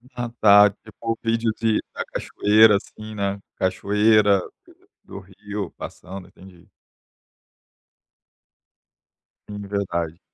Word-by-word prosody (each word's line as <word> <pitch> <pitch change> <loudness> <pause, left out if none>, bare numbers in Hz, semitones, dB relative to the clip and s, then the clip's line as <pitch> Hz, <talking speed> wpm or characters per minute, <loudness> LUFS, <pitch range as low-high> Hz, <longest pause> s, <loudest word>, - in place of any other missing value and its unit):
Ah, 120 -1 -4
tá. 105 -1 +7
Tipo 110 +2 -6
vídeo 115 0 0
de 110 -1 +1
da - - -4
cachoeira, 105 +1 +3
assim, 110 +2 -10
né, 100 -1 -2 0.2
cachoeira, 105 +1 +2 0.6
do - - -10
rio 100 0 -7
passando, 95 0 -10
entendi. 90 -2 -18 2.8
Sim, 105 0 -7
verdade. 85 -4 -3
105 Hz, 95 wpm, -22 LUFS, 95-110 Hz, 2.8 s, tá